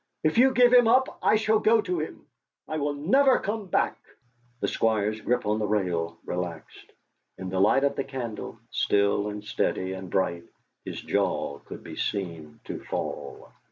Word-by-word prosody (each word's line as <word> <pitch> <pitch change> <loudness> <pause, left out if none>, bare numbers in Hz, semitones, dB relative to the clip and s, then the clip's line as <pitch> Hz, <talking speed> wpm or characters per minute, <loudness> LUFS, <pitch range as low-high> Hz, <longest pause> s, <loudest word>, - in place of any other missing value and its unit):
"If 155 +8 +2
you 265 +2 +7
give 250 -1 +5
him 245 -2 +7
up, 260 +3 +3
I - - +4
shall 215 0 +3
go 225 +1 +4
to 180 -5 -1
him; 155 - -6 0.4
I 155 - -3
will 145 0 -1
never 260 - +4
come 210 0 -3
back!" - - +1 0.6
The - - 0
Squire's 110 -1 0
grip 125 +2 0
on 105 +1 +1
the 105 - 0
rail 85 -5 -1
relaxed; 90 -3 -6 0.5
in 95 0 -5
the 95 - -1
light 120 +7 +4
of 140 - +2
the 135 - -1
candle, 120 -5 -6
still 100 0 +2
and 105 0 -5
steady 95 -2 -1
and 95 -1 -7
bright 85 -3 0 0.4
his - - -5
jaw 70 0 -1
could - - -9
be - - -8
seen 85 -6 -4
to - - -6
fall. - - -5
110 Hz, 175 wpm, -27 LUFS, -, 0.6 s, you